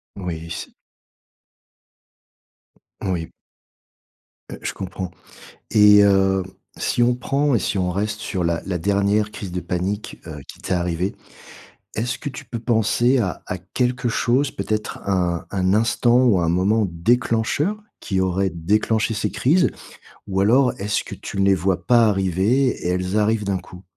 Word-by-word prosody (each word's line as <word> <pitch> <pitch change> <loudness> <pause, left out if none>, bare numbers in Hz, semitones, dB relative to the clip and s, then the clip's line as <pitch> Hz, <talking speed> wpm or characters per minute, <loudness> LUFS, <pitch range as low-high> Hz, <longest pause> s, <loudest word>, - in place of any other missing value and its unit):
Oui 85 -4 -5
c'est - - -6 2.3
Oui. 90 -4 -2 1.2
Heu, - - -8
je - - -3
comprends 95 -1 -6 0.6
et 105 -1 +7
hem, 95 -1 +4 0.3
si 120 - +1
on 120 0 +3
prend 140 +1 +1
et - - +3
si 100 - -1
on 90 -1 0
reste 105 +3 -2
sur 95 -5 -3
la 85 0 0
la 90 -2 -2
dernière 100 +3 +1
crise 95 -3 -7
de 90 - -2
panique, 95 +4 -3
heu, 75 -3 -7
qui - - -12
t'est - - -3
arrivée. 90 +1 -1 0.8
Est-ce 120 +3 -2
que 145 - -4
tu - - -9
peux 115 - -5
penser 120 +2 +2
à 95 -6 -2
à 95 - -4
quelque 125 +7 -1
chose, 130 +5 +1
peut-être 110 0 -3
à 100 - -2 0.2
un 85 - -7
un 95 -1 +1
instant 115 +2 +3
ou 105 -7 +4
un 85 -1 +1
moment 100 +4 +2
déclencheur? 115 - +1 0.2
Qui 95 -2 -2
aurait 95 +1 0
déclenché 105 +6 0
ces 105 - -1
crises 165 +8 +2 0.6
ou 95 0 0
alors 125 +6 +4
est-ce 105 +2 0
que - - -7
tu 100 - -6
ne 100 - +3
les 100 -1 +5
vois 90 +1 -1
pas 120 -2 +5
arriver 95 +6 +2
et 100 -7 -2
elles 90 +2 -1
arrivent 105 0 +1
d'un 100 -1 0
coup? 90 0 -12
100 Hz, 160 wpm, -22 LUFS, 90-115 Hz, 2.3 s, et